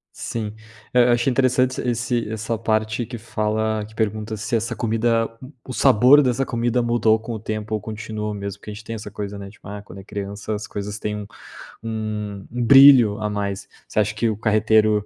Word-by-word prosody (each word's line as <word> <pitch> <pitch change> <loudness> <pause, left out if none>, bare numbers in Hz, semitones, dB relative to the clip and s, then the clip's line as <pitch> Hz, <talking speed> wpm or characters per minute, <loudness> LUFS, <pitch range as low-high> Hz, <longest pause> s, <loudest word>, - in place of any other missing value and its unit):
Sim. 110 -2 -4 0.4
Eu 125 -1 +6
eu 120 - +4
achei 120 +2 +2
interessante 130 0 +2
esse 120 -1 -1
essa 110 +1 -2
parte 110 +1 0
que 120 0 -7
fala 110 -1 -1
que 110 - -15
pergunta 110 0 -2
se 115 +3 -2
essa 115 +1 -1
comida 115 0 +1 0.4
o 130 - -5
sabor 125 +8 +6
dessa 130 +1 +1
comida 120 +1 0
mudou 115 -2 +2
com 115 +1 -6
o 110 - -5
tempo 110 0 -4
ou 105 - -3
continua 110 -1 -5
o - - -4
mesmo, 100 0 -6
porque 105 - -9
a - - -6
gente 105 +2 -10
tem 115 +1 -6
essa 105 -1 -8
coisa, 100 0 -5
né, 100 -1 -8
tipo, 105 - -16
ah, 100 0 -6
quando 100 -1 -12
é - - -10
criança 100 +2 -5
as 105 - -5
coisas 105 0 -5
têm 105 0 -3
um 105 -1 -7 0.6
um 105 -3 -4
um 120 0 -2
brilho 130 -6 +8
a 105 -1 -1
mais. 100 -1 -3 0.2
Você - - -1
acha 105 0 +1
que 115 +1 +1
o 105 - -2
carreteiro 110 -1 +3
110 Hz, 210 wpm, -22 LUFS, 105-115 Hz, 0.6 s, brilho